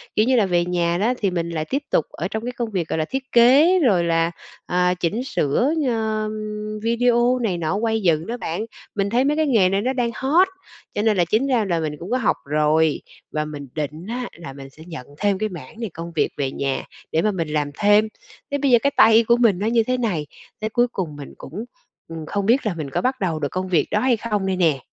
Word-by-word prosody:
kiểu 215 - +4
như, 255 +1 +3
là 220 - +4
về 175 -2 +1
nhà 175 -1 0
đó 220 +7 +1
thì 195 -3 0
mình 170 -1 -2
lại 155 -2 -3
tiếp 280 +2 -1
tục 155 - +2
ở 170 - -4
trong 220 +3 -4
cái 245 - -2
công 240 -2 -4
việc, 175 -5 -2
gọi 160 - -2
là, 155 - 0
thiết 265 0 -4
kế 280 +10 +6
rồi 200 - +3
là, 165 0 +1 0.3
à, 180 0 +2
chỉnh 180 +7 -2
sửa, 240 - +1 0.2
ờ, 220 -2 0
ừm, 215 0 -5
video 240 +2 +2
này 210 -7 -1
nọ 165 +2 -1
quay 220 +1 0
dựng 165 -3 +1
đó 240 +2 -3
bạn. 175 +1 -3 0.3
Mình 200 -1 0
thấy 245 +4 +2
mấy 295 +2 +1
cái 315 - +2
nghề 215 -9 +4
này 195 +1 +1
nó 260 +3 0
đang 240 -2 0
hot, 320 +8 +3 0.5
cho 205 - -1
nên 215 -2 +2
là 175 - +3
chính 220 +10 +1
ra 245 -5 +2
là 170 -4 0
mình 155 -2 -2
cũng 180 +7 -7
có 255 - +2
học 230 - +1
rồi, 150 +1 +2 0.3
và 150 0 -1
mình 145 -2 -7
định 155 +3 -4
á 245 +2 -3
là 170 -5 -9
mình 135 0 -10
sẽ 155 +4 -15
nhận 155 -7 -8
thêm 205 -2 +1
cái 215 0 -1
mảng 185 +6 -10
này 225 - -3
công 170 +1 -7
việc 155 - +2
về 135 -2 -1
nhà 135 -1 -2 0.3
để 160 - +2
mà 210 +3 +2
mình 170 -4 -2
làm 150 -1 -1
thêm. 210 +1 +5 0.4
Thế 285 - +1
bây 280 -2 +1
giờ 240 - +7
cái 280 - +3
tay 225 +1 +7
của 235 +2 +3
mình 225 -7 +3
nó 210 - -1
như 230 0 +3
thế 255 +3 -1
này, 185 -12 -1 0.3
thế 215 - -1
cuối 240 +2 +2
cùng 170 -9 -4
mình 145 -1 -9
cũng, 200 - -7 0.4
ừm, 165 -1 -7
không 200 +5 -2
biết 240 +6 +3
là 210 - 0
mình 155 -4 -5
có - - -1
bắt 260 +1 0
đầu 170 -6 -1
được 145 - -1
công 185 0 -3
việc 165 -5 +2
đó 210 - +2
hay 250 -2 +2
không 210 -3 -2
đây 190 -1 0
nè. 160 -7 +2
205 Hz, 260 wpm, -22 LUFS, 165-235 Hz, 0.5 s, giờ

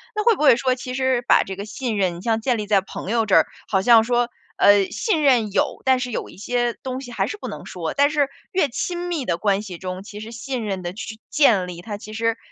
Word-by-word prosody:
那 425 - 0
会 460 -2 +5
不 - - -7
会 275 - +7
说， 255 0 +1
其 255 0 -7
实 260 -2 +1
把 - - +4
这 190 - -6
个 200 - -5
信 230 -1 -3
任 180 -3 0
像 225 0 0
建 240 0 0
立 210 -1 -4
在 205 -2 +4
朋 190 - -8
友 230 -2 +2
这 195 - +3
儿， - - +6 0.2
好 190 -2 +1
像 225 +1 +6
说， 240 0 +1 0.3
呃， 200 -1 +6
信 395 -10 0
任 240 -7 +3
有， - - 0
但 260 -1 +4
是 250 -1 -3
有 - - -4
一 - - -14
些 240 +3 -1
东 260 -1 -5
西 245 -2 -9
还 - - -1
是 420 - -5
不 - - -7
能 - - -8
说， - - -4
但 285 +1 +4
是 290 -3 +1 0.2
越 365 -6 +3
亲 350 +8 -3
密 310 -7 -2
的 170 - 0
关 200 +1 +1
系 185 -5 -8
中， 185 +1 -5
其 205 0 -9
实 225 +1 -8
信 245 0 -4
任 190 -2 -3
的 175 0 -4
去 220 +1 -7
去 - - -26
建 220 -11 +4
立， 175 -1 -8
它 205 +2 -6
其 215 0 -11
实 230 +1 -1
230 Hz, 290 characters per minute, -22 LUFS, 205-260 Hz, 0.3 s, 会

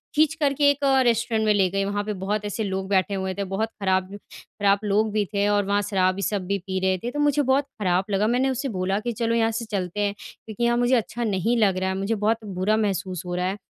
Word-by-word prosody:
खींच 310 0 +4
कर 290 -3 +1
के 285 +1 +4
एक 285 0 -5 0.2
रेस्टोरेंट 230 -2 +1
में 215 - +4
ले 195 -2 +3
गई। 195 +2 -1
वहाँ 205 +1 -2
पे 210 0 -3
बहुत 210 +2 -1
ऐसे 205 +2 -3
लोग 190 -1 -3
बैठे 195 +1 +1
हुए 190 -1 -2
थे, 200 +1 -3
बहुत 195 +4 -2
ख़राब, 190 0 0
ख़राब 200 0 -2
लोग 210 +1 +1
भी 210 -1 0
थे, 200 0 +1
और 205 -1 +2
वहाँ 205 +1 +1
शराबी 185 -1 +1
सब 200 -1 -1
भी 200 +1 0
पी 190 0 -1
रहे 190 0 +1
थे, 240 - -3
तो 295 - -4
मुझे 295 0 +3
बहुत 270 +1 +2
ख़राब 185 -2 +1
लगा। 200 +2 +2
मैंने 250 +3 +2
उससे 265 +2 -2
बोला 190 +2 0
कि 240 +2 -3
चलो, 230 0 -1
यहाँ 225 -1 +2
से 225 +1 -3
चलते 190 0 -3
हैं 205 -1 0
क्योंकि 220 +2 -8
यहाँ 235 0 +3
मुझे 245 +1 +3
अच्छा 235 0 -2
नहीं 220 +2 0
लग 200 -4 +3
रहा 190 0 -1
है, 190 - -2
मुझे 195 +4 -1
बहुत 220 +2 0
बुरा 195 +2 0
महसूस 190 -4 -2
हो 175 0 -3
रहा 180 0 -1
है। 195 +2 -3
205 Hz, 260 wpm, -24 LUFS, 190-230 Hz, 0.2 s, खींच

